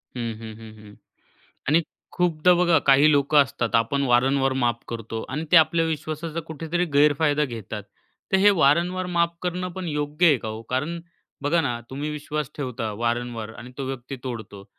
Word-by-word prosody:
हं, 115 -2 -3
हं, 110 -1 -8
हं, 110 -1 -11
हं. 105 -1 -14 0.7
आणि 160 +4 +4 0.3
खूपदा 175 -1 +3
बघा 175 -2 +4
काही 140 +3 +6
लोकं 145 +1 +5
असतात. 120 -4 -3
आपण 115 +5 +2
वारंवार 135 +2 +3
माफ 120 -1 +1
करतो 115 -1 -5
आणि 150 +5 -3
ते - - +8
आपल्या 165 +1 +5
विश्वासाचा 155 +1 -3
कुठेतरी 165 +3 -2
गैरफायदा 150 +1 +3
घेतात. 110 -5 -6 0.5
तर 190 - +6
हे 205 +2 +6
वारंवार 175 +2 +2
माफ 170 0 +2
करणं 180 0 -2
पण 185 -1 -5
योग्य 150 +2 +1
आहे 150 -5 +6
का 110 - -6
हो? 110 +1 -6
कारण 150 +7 -2 0.4
बघा 165 +4 +2
ना 120 -5 -2
तुम्ही 145 +3 -4
विश्वास 150 -1 -4
ठेवता 125 -5 -3
वारंवार 115 0 -3
आणि 125 +2 -11
तो 135 - -2
व्यक्ती 135 0 -6
तोडतो. 110 -5 -7
145 Hz, 170 wpm, -24 LUFS, 120-160 Hz, 0.7 s, ते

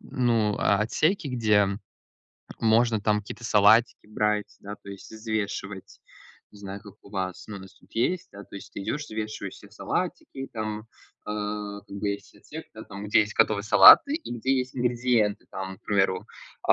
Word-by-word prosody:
ну, 115 -5 0
а 100 - +3
отсеки, 155 - +1
где 105 -5 +3 0.9
можно 115 0 +3
там 105 0 +1
какие-то 105 +3 -10
салатики 110 +1 +4
брать, 105 -1 -1
да, 100 +1 -8
то - - -16
есть 100 -1 -11
и - - -9
взвешивать. 105 -3 -4 0.5
Не 105 - -15
знаю, 100 0 -7
как 100 -3 -13
у 100 - -16
вас, 95 0 -4
у - - -7
нас 95 -1 -10
тут - - -25
есть, 170 +10 0
да. 100 0 -11
То - - -16
есть 100 - -10
ты - - -6
идешь, 145 +9 -3
взвешиваешь 110 -3 -5
себе - - -16
салатики, 135 0 -4
там, 110 -1 -4 0.5
э, 105 -1 -4
как 100 - -8
бы 105 - -2
есть 100 - -7
отсек, - - -10
да - - -9
там 100 +1 -8
где - - +5
есть 105 0 -2
готовые 100 -2 +2
салаты 105 - +8
и 325 - -5
где 130 +3 +1
есть 130 0 -4
ингредиенты, 120 -4 +1
там, 95 0 -6
к - - -43
примеру, 95 -2 +1 0.4
э, - - +9
105 Hz, 185 wpm, -26 LUFS, 100-115 Hz, 0.9 s, э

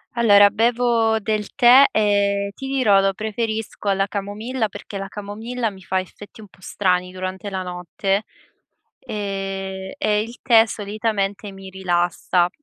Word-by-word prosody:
Allora 205 -3 +6
bevo 230 0 +2
del 210 -1 -3
tè, 260 +1 +8
ehm, 200 -1 +1
ti 270 - -7
dirò 255 -8 +3
lo 195 0 +2
preferisco 220 0 -4
alla 195 0 +2
camomilla, 215 +4 -3
perché 200 0 -9
la 195 0 -5
camomilla 220 +4 -4
mi 190 -1 -14
fa 185 0 0
effetti 205 +4 -13
un 210 - -13
po' 185 - -24
strani 180 -1 -1
durante 185 +2 -5
la 190 -1 -3
notte, 185 +3 -2 0.8
ehm, 195 -2 -5
e 210 -1 +1
il 230 +3 -8
tè 225 -2 +6
solitamente 205 -1 -3
mi 195 0 -10
rilassa. 175 -1 0
205 Hz, 145 wpm, -21 LUFS, 195-220 Hz, 0.8 s, tè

